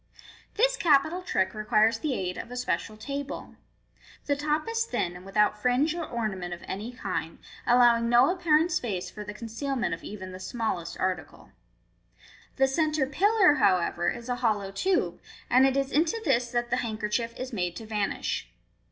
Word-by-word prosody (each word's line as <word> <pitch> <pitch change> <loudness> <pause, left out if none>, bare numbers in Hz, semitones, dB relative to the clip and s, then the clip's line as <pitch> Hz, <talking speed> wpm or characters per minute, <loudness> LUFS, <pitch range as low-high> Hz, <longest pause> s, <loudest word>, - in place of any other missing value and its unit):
This - - +3
capital 315 +3 +3
trick 190 - 0
requires 215 +1 +2
the 285 -1 -1
aid 180 -1 -3
of - - -7
a 250 - -7
special 225 -3 -2
table. 280 +4 -5 0.7
The 285 - +1
top 300 +3 -1
is 455 0 0
thin, 180 - -2
and 180 - -10
without 210 +1 +2
fringe 255 +7 +2
or 340 -1 -3
ornament 195 - -3
of 175 - -16
any 210 +5 -4
kind, 185 -8 -4 0.3
allowing 240 -1 +5
c^ 240 +10 +5
appa 345 -2 -7
rent 315 +3 +5
space 220 - -2
for 210 - -7
the 210 0 -8
concealment 240 - -3
of 165 - -6
even 190 -3 -7
the 185 - -8
smallest 185 -5 -3
article. 185 0 -3 1.0
The 270 0 +3
centre 305 +1 +1
pillar, 380 +5 +4
however, 175 -2 +2
is 235 0 -6
a 245 -1 -1
hollow 210 -5 0
tube, 360 - 0 0.3
and 260 +2 +6
it 270 0 0
is 275 0 0
into 325 +9 +2
this 245 -4 +2
that 240 -1 -2
the 250 - +2
handkerchief 230 0 -2
is 255 0 -5
made 180 -4 -2
to 225 - -7
vanish. 210 -2 -2
240 Hz, 175 wpm, -27 LUFS, 210-285 Hz, 1.0 s, and